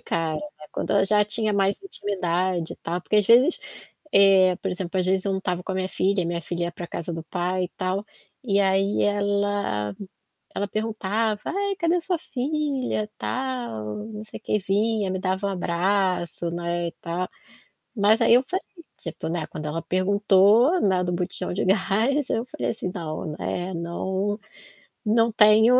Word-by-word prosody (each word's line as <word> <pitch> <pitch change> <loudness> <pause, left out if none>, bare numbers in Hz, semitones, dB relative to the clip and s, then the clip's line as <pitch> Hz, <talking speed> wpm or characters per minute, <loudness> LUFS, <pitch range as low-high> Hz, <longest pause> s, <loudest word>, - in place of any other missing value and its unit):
cara, 160 -2 -1 0.3
quando - - -3
eu 200 -1 +4
já 210 +1 +4
tinha 215 0 0
mais 200 - +1
intimidade 185 - -1
e - - -27
tal, 175 +2 -3
porque 210 - 0
às 210 -2 +4
vezes, 255 +9 +6 0.5
eh, 190 -2 +6
por 195 - -2
exemplo, 180 +1 -3
às 185 - +1
vezes 190 0 +1
eu 200 - +1
não 190 - 0
estava 180 -1 -2
com 195 - -4
a - - -2
minha 185 0 -1
filha 195 0 +1
e - - -2
minha 170 0 -2
filha 170 +2 -3
ia 170 - -2
para 175 0 -7
casa 170 0 -5
do 165 - -5
pai 180 +2 -1
e 180 - -10
tal, 185 +2 -1 0.4
e 200 -4 +2
aí 195 +1 +2
ela 200 - 0 0.6
ela 205 - -1
perguntava: 215 0 -1
“Ai, 400 0 -1
cadê 340 -1 +2
a 355 - +1
sua 355 -1 -1
filha, 270 -5 -2
tal, 245 - -3
não 215 -1 -7
sei 215 - -9
quê”, 210 - 0
vinha, 205 +1 +1
me 185 - -1
dava 190 +1 -1
um 200 - 0
abraço, 180 -1 0
né, 170 0 -2
e - - -8
tal. 175 +2 -3 0.7
Mas 215 +3 +4
aí 230 0 +6
eu 250 - +6
falei, 370 +9 -3 0.4
tipo, 165 - -6
né, 165 -2 -2
quando 155 - -7
ela 160 +2 -2
perguntou, 200 - +4
né, 185 -2 +3
do 180 - -1
botijão 175 0 -2
de 185 - -1
gás 220 +8 +2
eu 225 - 0
falei - - -3
assim: 200 -5 -3
“Não, 155 -2 -4
é 180 +1 -2
não 190 +5 -2 0.7
não 230 +2 +3
tenho 220 +3 +6
195 Hz, 180 wpm, -25 LUFS, 180-215 Hz, 0.7 s, vezes